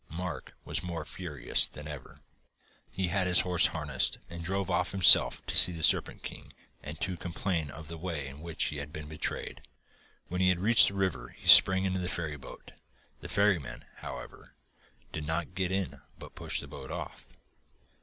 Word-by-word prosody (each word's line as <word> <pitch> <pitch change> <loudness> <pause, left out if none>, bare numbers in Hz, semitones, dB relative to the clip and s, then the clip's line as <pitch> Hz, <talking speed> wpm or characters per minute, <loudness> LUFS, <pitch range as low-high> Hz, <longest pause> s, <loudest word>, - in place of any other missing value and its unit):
Mark 85 -4 -7
was - - -2
more 85 -3 -6
furious 80 -7 -2
than 75 0 -11
ever. 75 -4 -10 0.7
He 95 -2 -3
had 95 +1 -1
his 90 - +5
horses 90 -1 +3
harnessed 75 -5 -2
and 85 0 -8
drove 95 +3 -3
off 90 +1 -1
himself 95 -5 +6
to - - -4
see 90 - +10
the 80 -1 -2
Serpent - - +4
King - - -10 0.3
and 75 +1 -9
to 90 - -2
complain 85 -2 -4
of 80 +2 -11
the 85 +1 -8
way 80 -5 -5
in 70 +2 -10
which 85 -1 -3
he 75 - -1
had 70 +1 -7
been 75 -1 -8
betrayed. 80 +1 -4 0.7
When 90 +1 -4
he 90 0 +4
reached 105 +5 +4
the 100 - -4
river 95 -6 -2
he - - -12
sprang 95 0 +7
into 95 -1 -2
the 90 0 -3
ferryboat. 75 -6 -7 0.5
The - - -10
ferryman, 95 -10 -1
however, - - -10 0.6
did 75 -1 -6
not 85 +3 -3
get 95 -1 -2
in 95 -1 -4 0.2
but - - -13
pushed - - -3
the - - -11
boat 65 - -10
off.... - - -8
85 Hz, 180 wpm, -29 LUFS, 75-95 Hz, 0.7 s, see